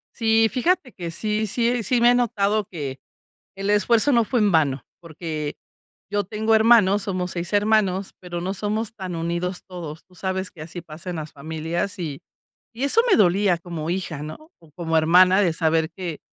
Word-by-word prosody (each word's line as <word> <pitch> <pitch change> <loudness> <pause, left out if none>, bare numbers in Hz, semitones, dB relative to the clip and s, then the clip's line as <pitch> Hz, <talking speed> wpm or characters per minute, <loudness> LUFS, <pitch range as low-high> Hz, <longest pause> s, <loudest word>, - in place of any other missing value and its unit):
Sí, 225 -1 +3
fíjate 275 0 0
que 170 -3 -6
sí 215 +5 -1
sí 235 +3 +1
sí 235 +4 +1
me 240 +1 +6
he - - +4
notado 215 -3 +1
que 140 -6 -5 0.6
el 195 +1 -2
esfuerzo 225 +6 +3
no 235 -2 +4
fue 245 +2 0
en 205 -2 +3
vano. 140 -5 +2 0.2
Porque 160 -3 -5 0.6
yo 205 0 0
tengo 220 +3 0
hermanos, 220 -3 +5
somos 185 -2 -2
6 170 +1 -4
hermanos, 205 -2 +2
pero 175 -1 -5
no 190 +3 -3
somos 215 +3 -2
tan 185 -4 -6
unidos 170 +2 -3
todos. 165 -4 -8
Tú 185 - -24
sabes 190 +1 -3
que 160 -5 -11
así 170 +2 -7
pasa 165 +2 -8
en 175 - -4
las 155 0 -6
familias 160 +6 -4
y 155 -5 -5 0.5
y 250 - -3
eso 360 +11 +5
me - - +6
dolía 195 -2 +3
como 170 -2 -6
hija, 175 -5 -3
¿no?, 230 - -9
o 165 - -20
como 165 0 0
hermana 180 +4 +5
de 180 -5 +2
saber 160 -1 +1
que, 175 -5 -5
185 Hz, 185 wpm, -23 LUFS, 165-215 Hz, 0.6 s, me